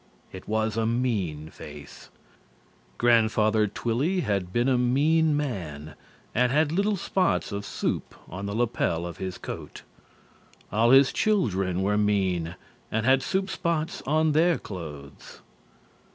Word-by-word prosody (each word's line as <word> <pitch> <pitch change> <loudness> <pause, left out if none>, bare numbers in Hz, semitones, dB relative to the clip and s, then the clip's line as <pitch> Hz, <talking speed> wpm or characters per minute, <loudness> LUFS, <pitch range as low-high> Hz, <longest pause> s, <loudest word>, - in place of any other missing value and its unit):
It 95 - -10
was 110 0 0
a 110 -1 +1
mean 100 -11 -1
face. 70 -1 -11 0.9
Grandfather 110 -2 +3
Twilly 130 - -1
had 100 - -1
been 120 +5 +1
a 130 - +3
mean 145 +5 +3
man 80 - -4 0.4
and 125 +1 +2
had 150 +1 +2
little 200 +5 +1
spots 185 - 0
of 100 0 -4
soup - - -3
on 100 +3 -6
the 100 - -4
lapel 110 -8 0
of 85 -2 -7
his 95 -1 -5
coat. - - -8 0.9
All 115 +3 +3
his 135 +1 +6
children 95 - +1
were 105 +2 +1
mean 95 -5 0 0.4
and 110 0 0
had 130 +1 +4
soup 190 +5 -1
spots 165 -2 -2
on 155 +2 +3
their 165 +3 +3
clothes. 75 -7 -9
110 Hz, 135 wpm, -26 LUFS, 95-145 Hz, 0.9 s, his